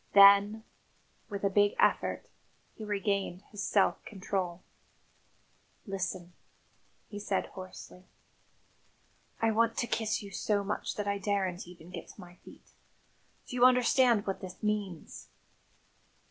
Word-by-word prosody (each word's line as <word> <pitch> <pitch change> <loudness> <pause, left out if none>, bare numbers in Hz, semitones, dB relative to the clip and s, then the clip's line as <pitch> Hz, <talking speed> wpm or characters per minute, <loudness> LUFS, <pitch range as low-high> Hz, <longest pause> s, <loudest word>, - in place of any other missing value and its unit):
Then, 200 +2 +7 0.7
with 200 -1 -5
a 200 - +3
big 205 +1 +3
effort, - - +2 0.5
he 220 - -9
regained 200 -2 -1
his 205 - -6
self 200 0 +2
control. 185 -3 -3 1.2
"Listen," 185 -3 -4 0.7
he 205 - -7
said 200 -1 -1
hoarsely. 185 -1 -10 1.4
"I 225 - +4
want 230 +1 +2
to - - +1
kiss 220 -2 -1
you 200 - -9
so 205 +1 0
much 200 +1 -3
that 205 -1 -3
I 200 0 0
daren't 190 -3 -1
even 175 -1 -13
get - - -7
to - - -15
my 180 -1 -12
feet. - - -17 0.7
Do - - -7
you 245 - +2
understand 250 -3 +5
what 195 - -3
that 185 +1 -9
means? 205 -6 -3
200 Hz, 130 wpm, -31 LUFS, 185-210 Hz, 1.4 s, Then